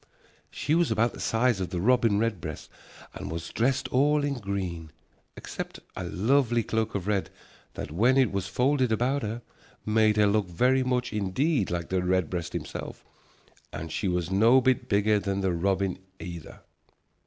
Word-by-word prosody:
She 150 - -2
was 170 0 +3
about 115 +2 +1
the - - -10
size 115 -3 +1
of 90 - -2
the 90 - -3
robin 115 0 +3
redbreast, 100 -9 -3 0.4
and - - -7
she - - -5
was 85 0 -5
dressed 130 +3 +1
all 145 +3 +3
in 140 -3 -1
green, 95 -6 -4 0.5
except - - -6 0.2
a 95 - -4
lovely 120 +6 +2
cloak 110 0 -1
of 95 -3 -2
red 100 -2 0 0.5
that, - - -6
when 120 - +3
it 130 -6 +4
was 95 -1 -2
folded 130 0 +1
about 125 +6 +1
her, 115 +2 -4 0.4
made 110 0 +3
her 105 - +5
look 100 -1 +2
very 125 +10 +2
much 125 -2 -1
indeed 105 - 0
like 85 -1 -3
the 95 -1 +1
redbreast 90 -2 -1
himself, - - -6 0.7
and 80 0 -6
she 100 - -2
was 90 -1 -1
no 115 +7 +5
bit 130 0 +1
bigger 105 +1 +3
than 100 -1 -2
the 95 -1 +1
robin 95 +1 0 0.2
either. 85 -1 -9
105 Hz, 170 wpm, -27 LUFS, 95-125 Hz, 0.7 s, her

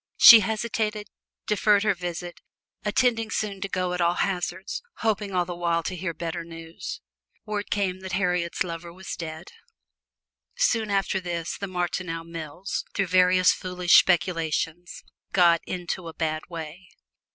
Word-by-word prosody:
She 230 - +11
hesitated, 215 0 -2 0.4
deferred 210 0 +3
her 215 -1 +3
visit 175 -1 -6 0.4
intending 225 +1 +1
soon 205 -3 -3
to 195 - -3
go 185 -1 -1
at 180 - -2
all 170 +1 +3
hazards 185 0 -2 0.2
hoping 210 -2 0
all 180 -2 +1
the 175 0 -5
while 170 -1 0
to 185 - -3
hear 175 0 -3
better 170 0 -4
news. 165 0 -8 0.4
Word 210 -1 -3
came 190 -3 -1
that 190 0 -7
Harriet's 180 -2 0
lover 170 -1 -6
was 185 +2 -7
dead. 160 -1 -7 1.0
Soon 225 -2 +1
after 195 -1 +1
this 170 -2 -4
the 200 - -5
Martineau 175 -2 -3
mills, 165 +2 -5
through 195 - +1
various 185 0 +5
foolish 180 -1 -1
speculations, 175 -1 +2 0.3
got 170 -3 +5
into 180 0 -4
a 165 - -8
bad 155 -1 -2
way. 170 +2 -8
180 Hz, 145 wpm, -25 LUFS, 170-195 Hz, 1.0 s, She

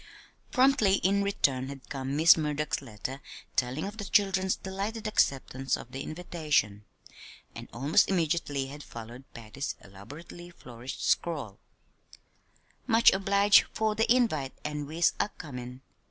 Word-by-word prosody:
Promptly 255 -7 +4
in 200 +2 +3
return 135 -10 0
had 140 -2 -10
come 135 0 -4
Miss 160 +2 +8
Murdock's 150 -1 -2
letter 130 +2 -7 0.3
telling 130 +6 -1
of 205 +2 -7
the 205 - -5
children's 190 -1 +2
delighted 200 +4 -5
acceptance 135 - 0
of 120 - -11
the 135 - -5
invitation; 150 - -1 0.7
and - - -9
almost 140 +6 +2
immediately 160 -6 0
had 145 +2 -9
followed 120 +1 -10
Patty's 115 +5 -5
elaborately 145 - -12
flourished 125 -6 -7
scrawl: 140 - -1 1.3
"Much 230 +1 +6
obliged 200 +1 +4
for 220 -1 0
de 225 +2 +1
invite 185 - +2
an 150 -1 -3
wes 165 +3 +2
Acomin. 125 -9 -5
150 Hz, 125 wpm, -29 LUFS, 130-195 Hz, 1.3 s, Miss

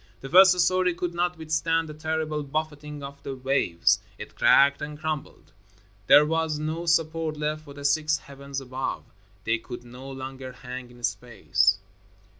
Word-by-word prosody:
The 135 - -7
first 185 +2 +7
story 180 0 +2
could 175 0 -3
not 175 0 -1
withstand 160 +1 0
the 155 - -7
terrible 155 0 -2
buffeting 150 0 -4
of 140 0 -9
the 135 - -5
waves. 130 -10 +2 0.2
It - - -9
cracked 140 0 +5
and 150 0 -5
crumbled. 155 -2 -5 0.6
There 150 - +8
was 160 -1 0
no 160 +3 -3
support 165 -1 +1
left 155 +1 -3
for 140 -2 -11
the 145 0 -8
six 155 +1 +2
heavens 140 0 -7
above. 130 0 -4 0.4
They 115 0 0
could 120 +1 -9
no 125 +3 -11
longer 130 -1 -7
hang 125 0 -8
in 120 0 -16
space. 105 -4 +1
150 Hz, 160 wpm, -26 LUFS, 135-160 Hz, 0.6 s, There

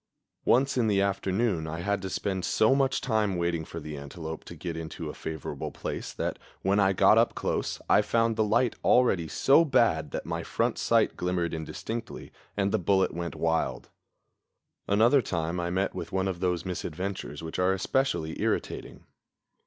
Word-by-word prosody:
Once 130 +1 +3
in 115 - +2
the 100 -2 +2
afternoon 100 -2 0
I 80 +2 -4
had 100 +2 -1
to 95 - -4
spend 95 0 -2
so 110 +7 +3
much 135 -1 +1
time 110 -6 +1
waiting 85 -2 -1
for 85 - -7
the 75 -1 -7
antelope 80 +3 -7
to 85 - -9
get 85 +1 -5
into 80 -1 -5
a - - -12
favorable 80 -3 -5
place - - -5
that, - - -3 0.2
when 100 +2 +3
I 95 -1 +4
got 95 - +5
up - - +2
close, - - -2
I - - +5
found 115 -1 +1
the 110 - +2
light 115 +3 +2
already 95 -10 +4
so 135 - +4
bad 115 - +2
that - - -5
my - - -3
front - - -1
sight - - +2
glimmered 90 -2 -1
indistinctly, 110 +8 -6 0.3
and 100 -1 +1
the - - +2
bullet 95 0 +2
went 85 +1 -4
wild. 80 0 -1 1.0
Another 115 +7 +5
time 85 -4 -2
I 85 0 -1
met 95 +2 0
with - - -6
one 95 0 0
of 95 -2 -3
those 90 -1 -1
misadventures 90 -3 -4
which 80 +2 -5
are 90 +1 +3
especially 95 -4 -1
irritating. - - -2
95 Hz, 175 wpm, -28 LUFS, 85-110 Hz, 1.0 s, got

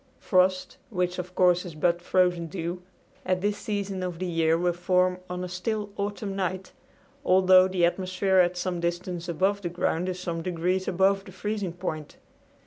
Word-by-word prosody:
Frost 185 +6 +1
which 180 -4 -1
of 180 0 -6
course 180 -1 +4
is 175 -4 -8
but 170 +2 +1
frozen 180 -2 +2
dew 175 +1 -4 0.4
at 185 0 0
this 205 +1 -1
season 200 -3 -3
of 180 -2 -3
the 185 - -3
year 165 -2 +2
will 175 +1 +1
form 180 +1 +1
on 180 0 -4
a - - -3
still 205 +3 -3
autumn 200 -1 -3
night, 185 0 -3 0.5
although 185 0 +6
the 185 -2 +2
atmosphere 185 +2 0
at 180 0 +3
some 180 -1 -2
distance 175 0 -3
above 190 +4 +1
the 175 - -3
ground 175 +1 -1
is 185 0 -4
some 170 -2 -3
degrees 180 +2 -1
above 195 +2 +2
the 190 - -11
freezing 200 -1 -3
point. 155 -4 -5
180 Hz, 175 wpm, -26 LUFS, 175-190 Hz, 0.5 s, although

